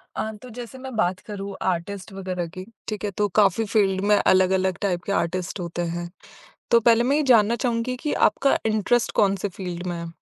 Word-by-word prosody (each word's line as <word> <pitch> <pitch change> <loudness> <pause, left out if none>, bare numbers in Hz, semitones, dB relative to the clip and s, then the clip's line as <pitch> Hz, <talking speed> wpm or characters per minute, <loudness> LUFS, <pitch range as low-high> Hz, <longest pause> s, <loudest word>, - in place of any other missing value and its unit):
अ, 220 - -2
तो 250 - -11
जैसे 245 +2 -8
मैं 260 -1 -8
बात 185 -4 +1
करूँ 200 -2 -6 0.2
आर्टिस्ट 185 +4 -5
वगैरह 185 -2 -4
की, 185 +3 -9 0.2
ठीक 215 -2 -4
है 205 - -2
तो 210 - +2
काफ़ी 205 +2 +3
फ़ील्ड 200 -3 +1
में - - +7
अलग-अलग 190 -1 +3
टाइप 180 -3 -1
के - - -4
आर्टिस्ट 185 +1 -1
होते 175 0 -4
हैं। 175 0 -4 0.6
तो 235 - +7
पहले 230 0 +4
मैं 275 +4 +2
ये 305 - +2
जानना 220 0 +4
चाहूँगी 240 +1 -1
कि 300 - +1 0.2
आपका 275 0 +1
इंटरेस्ट 220 +2 +1
कौन-से 200 0 +1
फ़ील्ड 180 -2 -5
में 175 -1 -3
है? 170 0 -7
200 Hz, 200 wpm, -24 LUFS, 185-230 Hz, 0.6 s, में